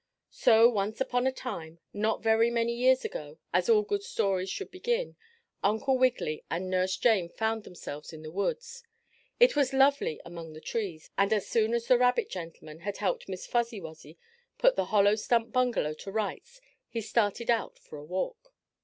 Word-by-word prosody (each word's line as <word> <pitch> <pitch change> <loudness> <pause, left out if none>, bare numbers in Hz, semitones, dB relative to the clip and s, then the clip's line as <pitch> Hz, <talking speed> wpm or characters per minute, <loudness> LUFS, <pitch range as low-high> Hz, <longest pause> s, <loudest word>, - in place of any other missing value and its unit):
So, 230 0 +6
once 215 -2 -1
upon 250 -1 +1
a - - +2
time, 170 -11 -7 0.2
not 215 +2 -1
very 225 +1 +4
many 235 0 0
years 255 - +3
ago, 485 +1 -6 0.2
as - - +2
all 430 -2 +5
good 415 -1 -2
stories 195 - -1
should 395 - -5
begin, 475 +6 -2 0.5
Uncle 220 +6 +2
Wiggily 250 -12 +1
and 185 +2 -3
Nurse 185 0 +1
Jane 210 -8 +3
found 220 +2 -2
themselves 150 -4 -8
in 160 -1 -10
the 155 - -8
woods. 475 - -3 0.6
It - - +6
was 280 -2 +2
lovely 270 - +3
among 170 -2 -9
the 155 - -10
trees, 180 -4 -4
and 195 0 +3
as 210 -3 +1
soon 225 0 +1
as 235 -1 -2
the 250 -1 +4
rabbit 250 - +2
gentleman 165 -3 -8
had 200 +3 -4
helped 200 -1 -2
Miss 185 -1 -5
Fuzzy 235 -2 -1
Wuzzy 160 -2 -11 0.4
put - - +4
the - - 0
hollow 205 -1 +4
stump 230 +2 0
bungalow 245 -12 +1
to 195 +5 -9
rights 220 - -4 0.3
he 230 - -3
started 225 +1 0
out 230 - -1
for - - -12
a - - -10
walk. 460 - -5
225 Hz, 180 wpm, -29 LUFS, 185-260 Hz, 0.6 s, So